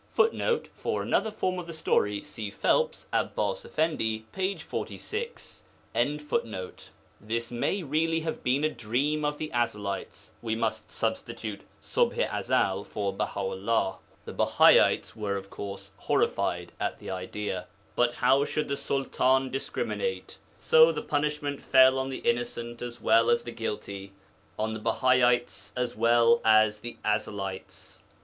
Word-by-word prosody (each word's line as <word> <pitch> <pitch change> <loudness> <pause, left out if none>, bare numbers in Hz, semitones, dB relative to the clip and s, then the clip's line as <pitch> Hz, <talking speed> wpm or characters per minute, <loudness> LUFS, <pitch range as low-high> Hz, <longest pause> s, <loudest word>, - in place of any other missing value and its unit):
[Footnote: 460 +1 +2
For - - -2
another 220 - +1
form 185 -4 -2
of 175 - -7
the 165 - -6
story, 105 -10 +1
see 110 -2 -5
Phelps, 480 - +1
Abbas - - 0
Effendi, 110 - -1
p. 190 +1 -1
46.] 470 +2 -5 1.6
This 115 +3 -3
may 175 +11 -1
really 165 +2 +1
have 160 0 -4
been 135 +4 +2
a 155 - +3
dream 135 +5 -1
of 150 0 0
the 155 0 -5
Ezelites 105 -5 -2
(we 110 -1 -1
must 115 - -2
substitute 105 -2 -3 0.2
Ṣubḥ - - +1
i - - 0
Ezel 95 +1 +1
for 100 -1 -3
Baha 100 0 -2
'ullah); 95 +1 0 0.3
the - - -7
Bahaites - - +4
were 105 -3 -2
of 95 0 -6
course 100 -1 -7
horrified - - 0
at - - -2
the - - -7
idea. 95 +3 -4 0.3
But 120 0 +3
how 130 +3 +3
should 150 0 -2
the 140 - -1
Sultan 130 -1 +1
discriminate? 470 - -3 0.2
So 475 0 +6
the - - -4
punishment 145 -1 -1
fell 130 0 +6
on 130 0 -2
the 130 - -5
innocent 120 0 -1
as 120 -1 -6
well 115 +1 +4
as 120 - +3
the 120 - -6
guilty, 100 -3 -5 0.4
on 110 +1 -1
the 110 - -4
Bahaites 120 +1 +2
as 125 -1 -2
well 115 0 +4
as 110 -1 +5
the 120 +2 -7
Ezelites. 100 -2 -3
120 Hz, 140 wpm, -28 LUFS, 110-150 Hz, 1.6 s, So